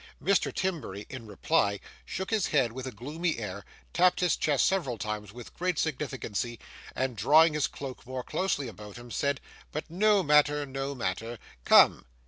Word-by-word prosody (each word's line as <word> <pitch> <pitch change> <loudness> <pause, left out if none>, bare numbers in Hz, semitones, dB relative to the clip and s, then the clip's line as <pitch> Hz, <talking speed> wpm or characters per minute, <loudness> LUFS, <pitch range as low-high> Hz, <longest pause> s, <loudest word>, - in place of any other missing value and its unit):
Mr. 195 -1 +2
Timberry, 155 - -3
in 125 -4 -8
reply, 100 0 +1 0.3
shook 190 +3 -4
his 215 -4 +2
head 135 -6 +2
with 130 +2 -6
a - - -4
gloomy 155 - -3
air, 100 -3 -5 0.3
tapped 180 0 +4
his 180 -3 +2
chest 145 -3 +2
several 155 -12 0
times 105 0 -4
with 120 +2 -11
great 180 -2 -1
significancy, 130 -7 -2 0.4
and 130 -2 -1
drawing 155 - +5
his 150 -1 +1
cloak 130 -3 -8
more 130 -1 -4
closely 145 -6 -1
about 105 -1 -10
him, 120 0 -11
said, 140 +2 0 0.3
'But 155 +1 -5
no 205 +2 +3
matter, 150 -1 +4
no 135 +1 -4
matter. 115 +1 -3 0.3
Come! - - +6
135 Hz, 165 wpm, -29 LUFS, 115-160 Hz, 0.4 s, Come